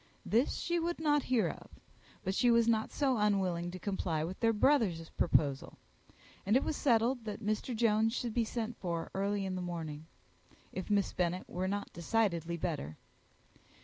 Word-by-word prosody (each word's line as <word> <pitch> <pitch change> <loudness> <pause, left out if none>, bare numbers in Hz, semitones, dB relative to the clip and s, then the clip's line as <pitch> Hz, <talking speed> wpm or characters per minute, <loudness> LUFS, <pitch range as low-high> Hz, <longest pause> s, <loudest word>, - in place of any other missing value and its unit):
This 235 +6 +2
she 345 0 -1
would 340 0 -2
not 295 -2 +3
hear 250 -4 +2
of; - - -9 0.5
but 190 - -1
she 245 +5 +3
was 235 -1 +4
not 220 -1 +1
so 270 -4 +1
unwilling 190 -5 +1
to 180 - -6
comply 180 -5 -2
with 180 +4 -5
their 230 -1 +3
brother's 210 - +2
proposal; 140 -3 +1 0.7
and 210 +5 +4
it - - 0
was - - -1
settled 240 -1 +2
that 210 -1 -4
Mr. 215 +3 -1
Jones 220 -1 +3
should 240 -3 -2
be 235 - +2
sent 230 +1 -3
for 170 -3 -3
early 200 +1 -1
in 190 - -3
the 185 - -3
morning, 160 -3 -5 0.6
if 185 - -5
Miss 205 -1 +2
Bennet 180 0 -1
were 185 +1 -2
not 200 +1 -3
decidedly 170 -2 0
better. 150 - -3
205 Hz, 175 wpm, -33 LUFS, 175-230 Hz, 0.7 s, was